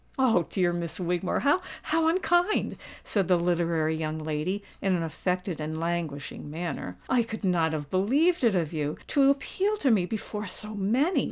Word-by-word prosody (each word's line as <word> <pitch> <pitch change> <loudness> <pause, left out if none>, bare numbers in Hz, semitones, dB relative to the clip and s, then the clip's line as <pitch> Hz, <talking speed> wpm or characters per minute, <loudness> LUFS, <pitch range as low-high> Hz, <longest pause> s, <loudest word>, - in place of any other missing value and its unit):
"Oh! 225 - +3
dear 175 -2 +1
Miss 170 0 -3
Wigmore, 180 0 0
how 290 +6 +3 0.5
unkind!" 350 +3 +2 0.3
said 195 -5 0
the 180 - +4
literary 170 -2 +1
young 155 0 -2
lady, 155 +6 -2 0.2
in 190 -2 +2
an 170 - -1
affected 180 +1 -2
and 155 +1 -3
languishing 165 -4 -3
manner. 155 - -4
"I 250 - +3
could 225 -1 -5
not 170 -4 +2
have 145 -2 -4
believed 275 - +2
it 225 -5 +4
of 170 -3 0
you—to 160 - +1
appeal 385 +9 0
to 275 -9 +2
me 190 -5 +3
before 210 -1 -4
so 210 +3 -4
many! 235 - +2
180 Hz, 165 wpm, -27 LUFS, 160-230 Hz, 0.5 s, the